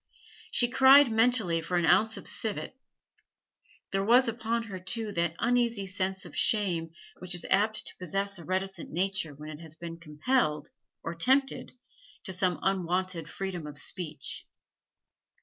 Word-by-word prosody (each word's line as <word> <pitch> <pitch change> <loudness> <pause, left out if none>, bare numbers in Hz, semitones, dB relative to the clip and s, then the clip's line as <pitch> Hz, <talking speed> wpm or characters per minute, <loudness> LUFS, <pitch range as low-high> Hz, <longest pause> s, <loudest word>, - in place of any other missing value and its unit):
She 240 - +3
cried 265 +1 +7
mentally 220 -7 +2
for 175 +2 -1
an 170 - +2
ounce 220 +6 +4
of - - -6
civet. 220 +3 -1 1.2
There 195 0 0
was 245 +5 +5
upon 230 0 -1
her, 200 -5 -7
too, 215 +4 -2
that 170 -3 -1
uneasy 235 -4 +1
sense 190 0 -2
of 170 - -11
shame 180 -7 +1 0.3
which 180 0 -1
is 175 - -1
apt 210 +2 +2
to - - -5
possess 195 +2 -1
a - - -9
reticent 190 0 -3
nature 180 -3 -1
when 150 +2 -9
it 150 - -9
has 160 -2 -9
been 165 0 -8
compelled, 150 - -1 0.3
or 165 - -4
tempted, 265 +11 +1 0.5
to 190 - -2
some 180 -1 +1
unwonted 185 -3 -1
freedom 185 -5 -5
of 145 -1 -9
speech. 165 +1 -4
190 Hz, 150 wpm, -29 LUFS, 170-225 Hz, 1.2 s, cried